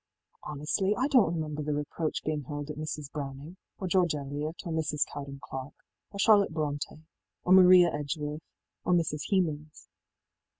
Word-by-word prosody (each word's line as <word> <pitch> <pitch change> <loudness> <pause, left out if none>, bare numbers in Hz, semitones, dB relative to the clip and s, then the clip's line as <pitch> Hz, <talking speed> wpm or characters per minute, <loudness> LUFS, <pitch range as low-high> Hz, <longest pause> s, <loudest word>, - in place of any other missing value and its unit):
í - - -44
Honestly, 150 +8 0
I 260 - +2
donít 210 - +4
remember 155 -2 -3
the 150 0 -1
reproach 150 +2 -3
being 155 -1 -1
hurled 145 +2 -5
at - - -7
Mrs. 150 -2 -5
Browning, 145 +4 -6 0.2
or 190 - -4
George 180 -3 +2
Eliot, 145 +3 -4
or 170 - -3
Mrs. 155 -2 0
Cowden 140 -1 -8
Clarke, 135 +1 -8 0.2
or 200 - -10
Charlotte 200 -1 +5
BrontÎ, 150 0 -3 0.4
or 180 - +4
Maria 180 -2 +8
Edgeworth, 150 +1 -3 0.4
or 180 - +2
Mrs. 155 -3 0
Hemans. 155 -6 -1
155 Hz, 160 wpm, -29 LUFS, 145-175 Hz, 0.4 s, Maria